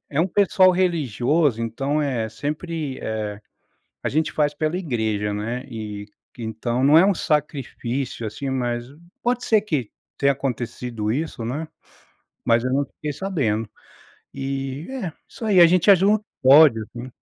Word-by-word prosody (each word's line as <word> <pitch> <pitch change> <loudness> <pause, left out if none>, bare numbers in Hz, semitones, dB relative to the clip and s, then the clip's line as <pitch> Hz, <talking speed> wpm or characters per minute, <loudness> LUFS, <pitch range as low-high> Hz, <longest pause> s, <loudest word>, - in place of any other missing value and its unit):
é 150 +2 +1
um 175 - +3
pessoal 190 0 +4
religioso, 150 - +1
então 135 +6 -1
é 120 -6 -1
sempre 150 +4 -4
eh, 105 -1 -4 0.6
a - - 0
gente 155 +2 0
faz 150 -1 +1
pela 155 +3 -1
igreja, 110 - -1
né, 115 +5 -3
e 105 -2 -6 0.3
que 120 - -10
então 120 +3 -2
não 150 +3 +6
é 180 - +6
um 200 - +3
sacrifício, 135 -6 -2
assim, 120 +6 -5
mas 120 -2 -1 0.4
pode 245 +1 0
ser 220 -2 +4
que 150 - -2 0.3
tenha 140 0 +4
acontecido 120 -4 -3
isso, 145 -4 -3
né, 145 +7 -3 0.8
mas 115 0 +3
eu 130 - 0
não 140 +1 +2
fiquei 150 +2 -6
sabendo. 125 - -1 0.7
E, 135 +2 -4
é, 210 -11 -4 0.2
isso - - -11
aí 200 -4 +4
a 170 - +10
gente 180 +3 +3
ajuda 195 +3 +5 0.3
como 130 +1 +7
pode, 145 -7 +7
assim. 120 +3 -9
135 Hz, 155 wpm, -23 LUFS, 115-160 Hz, 0.8 s, a